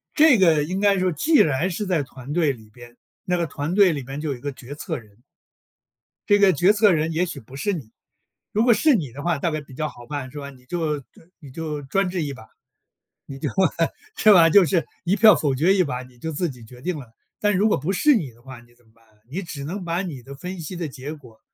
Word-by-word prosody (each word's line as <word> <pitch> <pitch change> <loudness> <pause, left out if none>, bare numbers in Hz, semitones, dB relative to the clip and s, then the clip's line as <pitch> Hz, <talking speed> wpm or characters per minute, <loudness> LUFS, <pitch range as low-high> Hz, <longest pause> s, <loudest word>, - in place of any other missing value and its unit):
这 300 -6 +6
个 165 -6 +4
应 185 +6 -3
该 200 -1 +3
说 185 0 +1
既 295 - +1
然 160 - +3
是 200 +4 -3
在 180 -6 +1
团 135 0 -9
队 155 -4 +2
里 110 -3 -15
边， 120 -1 -14 0.3
那 180 - +1
个 170 - 0
团 145 +4 -3
队 200 -3 +6
里 145 -3 -3
面 135 +3 -7
就 155 - -3
有 130 - -4
一 - - -16
个 145 - -4
决 130 +2 -10
策 145 - -4
人。 105 -3 -16 1.1
这 205 0 +5
个 195 -2 +5
决 180 +8 +4
策 210 -1 +4
人 160 -1 +1
也 170 +3 +1
许 175 - -7
不 125 +4 -14
是 145 +9 -1
你， 130 -10 -7 0.6
如 215 - +2
果 235 -1 +6
是 280 +5 +4
你 150 - -2
的 140 +4 -8
话 170 -3 +1
大 165 +3 -1
概 155 - -3
比 140 -2 -15
较 155 +2 -2
好 120 0 -14
办， 140 -3 -5
是 150 - -7
吧。 140 -1 -7
你 125 -2 -17
就 155 -2 -2
就 135 - -17 0.3
你 145 -6 -12
就 150 -1 -5
专 190 +7 0
制 175 -3 -2
一 145 - -4
把 110 -3 -13 0.8
你 135 - -9
就 - - -3 0.7
是 215 - +5
吧？ 170 -4 +7
就 190 +2 +6
是 170 -1 +1 0.2
一 185 +4 +2
票 215 -3 +7
否 140 -4 0
决 170 +9 +3
一 185 - +4
把， 130 -5 -4
你 125 -1 -18
就 160 +6 -5
自 170 +3 -1
己 125 -4 -11
决 125 +2 -14
定 180 -1 -2
了。 125 -6 -11 0.3
但 210 -1 +2
如 210 - +3
果 215 - +2
不 150 +7 -2
是 285 +8 +4
你 150 - -2
的 115 - -23
话 130 -1 -11
你 120 0 -23
怎 120 0 -29
么 110 - -28
办？ 115 - -28 0.3
你 175 +8 -4
只 160 -6 -7
能 185 +5 -5
把 170 +1 -1
你 155 -9 -6
的 140 +2 -10
分 180 +4 -7
析 165 +4 -6
的 170 -2 -3
结 140 +2 -7
果， 125 -8 -15
155 Hz, 280 characters per minute, -23 LUFS, 135-185 Hz, 1.1 s, 吧